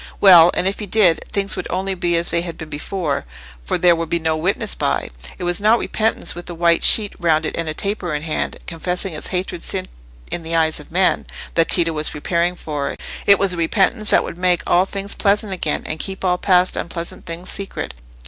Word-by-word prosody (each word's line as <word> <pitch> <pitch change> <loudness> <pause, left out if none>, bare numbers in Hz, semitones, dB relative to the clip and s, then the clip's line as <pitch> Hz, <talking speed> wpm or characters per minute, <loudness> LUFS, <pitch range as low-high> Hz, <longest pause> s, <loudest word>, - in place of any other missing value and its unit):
Well—and 180 -2 +7
if 195 - -2
he 210 - -5
did, 180 -5 +3
things 200 -1 0
would - - -4
only 195 +1 -1
be 175 -2 0
as 170 - -1
they 170 - +2
had 170 -1 -6
been 160 -1 -9
before; 150 -1 -3 0.4
for - - -1
there 175 -1 +5
would 165 -1 -4
be 170 - +1
no 160 -1 0
witness 195 +6 -1
by. 65 -3 -1 0.3
It - - -7
was 175 +1 0
not 215 +3 +4
repentance 225 -1 0
with 175 +1 -8
a 175 - -6
white 170 0 +2
sheet 210 -3 +3
round 160 -2 +2
it - - -3
and 165 -1 -2
taper 200 -4 -2
in 150 - -4
hand, 160 -1 -2
confessing 180 +2 -3
its 150 - -4
hated 180 -2 -3
sin 185 -1 -2 0.4
in 175 - -1
the 165 0 -2
eyes 160 -1 +1
of 150 - -13
men, 185 +2 +1 0.3
that 165 -1 +2
Tito 165 -2 +3
was 155 0 -1
preparing 170 +4 -1
for: 150 -4 -4 0.3
it 200 - +7
was 195 -2 +1
a - - -5
repentance 195 +6 +1
that - - +4
would 170 - -7
make 180 -1 +2
all 180 +2 +3
things 200 +1 -3
pleasant 205 0 +1
again, 160 -5 -1
and 155 - -4
keep 190 -1 -4
all 180 -1 +1
past 180 -1 +3
unpleasant 170 +1 -5
things 170 +2 -5
secret. 195 0 -5
175 Hz, 215 wpm, -20 LUFS, 165-195 Hz, 0.4 s, Well—and